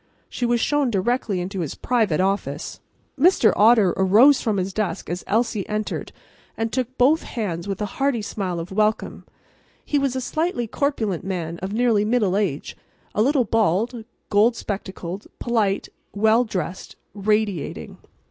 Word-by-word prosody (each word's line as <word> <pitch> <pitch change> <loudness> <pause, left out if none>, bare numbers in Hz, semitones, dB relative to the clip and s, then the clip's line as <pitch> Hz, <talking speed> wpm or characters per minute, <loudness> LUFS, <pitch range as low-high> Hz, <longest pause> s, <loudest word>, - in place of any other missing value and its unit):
She 245 - -2
was 240 0 +2
shown 290 +1 +1
directly 215 -1 0
into 190 +2 -4
his 160 -5 -3
private 220 -10 +1
office. 195 +2 -2 0.4
Mr. 325 -7 +5
Otter 215 -4 +5
arose 220 +9 +5
from 215 -3 0
his 190 +1 -2
desk 215 -4 -3
as 180 - -4
Elsie 220 -2 0
entered 215 0 -3 0.5
and 225 -1 -2
took 255 0 -2
both 290 +6 +4
hands 190 -7 -4
with 195 -1 -3
a 205 +6 -7
hearty 270 -6 +1
smile 185 -5 -3
of 165 +3 -7
welcome. 215 +2 0 0.6
He 290 - +1
was 275 -2 0
a - - 0
slightly 310 -1 -1
corpulent 220 - -1
man 170 -3 -4
of 190 +1 -5
nearly 225 -2 +2
middle 210 -4 +1
age, 190 -9 -2 0.4
a - - +1
little 265 +1 +3
bald, 225 +2 +1 0.3
gold 215 +4 +4
spectacled, 190 -2 -6
polite, 215 -5 0 0.3
well 220 +4 +4
dressed, 185 -3 -5 0.2
radiating. 205 -5 -1
215 Hz, 150 wpm, -23 LUFS, 190-240 Hz, 0.6 s, Mr